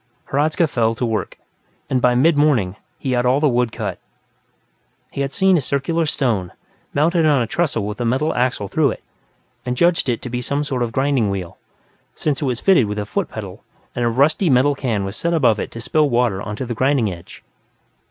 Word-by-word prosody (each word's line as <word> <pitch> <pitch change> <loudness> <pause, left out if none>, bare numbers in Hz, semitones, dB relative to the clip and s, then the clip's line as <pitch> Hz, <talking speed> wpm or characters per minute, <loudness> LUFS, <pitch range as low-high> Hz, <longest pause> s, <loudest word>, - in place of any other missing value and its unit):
Hradzka 155 +4 +2
fell 115 -5 0
to 120 - -2
work, 110 -2 -3 0.5
and 130 -1 0
by 125 0 +3
mid 155 +6 +4
morning, 130 -11 +2 0.2
he 130 - -3
had 120 -1 +1
all 125 +2 +3
the 150 - +3
wood 120 -3 +1
cut. - - -4 1.1
He 140 - -4
had 135 0 -2
seen 190 +1 +3
a - - +1
circular 155 +5 -1
stone, 110 -12 -1 0.4
mounted 160 +2 +2
on 145 -3 +4
a 120 - +1
trestle 115 -4 -1
with 105 +3 -5
a - - +1
metal 135 +7 +1
axle 125 -5 0
through 150 +5 +2
it, - - -6 0.6
and 125 0 -3
judged 170 -4 +2
it 120 - 0
to 125 - -5
be 125 0 -2
some 140 +4 -1
sort 130 -4 -3
of 120 - 0
a - - -13
grinding 135 -4 +1
wheel, 95 -3 -5 0.6
since 150 -2 -2
it - - 0
was 125 -3 -1
fitted 185 - +4
with 105 +1 -4
a 105 - -2
foot 180 - -2
pedal 100 -1 -8 0.3
and 120 - -1
a 120 - +2
rusty 145 - +2
metal 135 +2 +4
can 115 -8 -2
was 95 +2 -5
set 170 +6 -1
above 120 -9 +3
it - - -3
to 115 - -9
spill 150 +5 +1
water 120 -6 +1
onto 105 +5 -5
the 120 - -3
grinding 130 -4 +1
edge. 85 -1 -13
125 Hz, 215 wpm, -20 LUFS, 115-145 Hz, 1.1 s, mid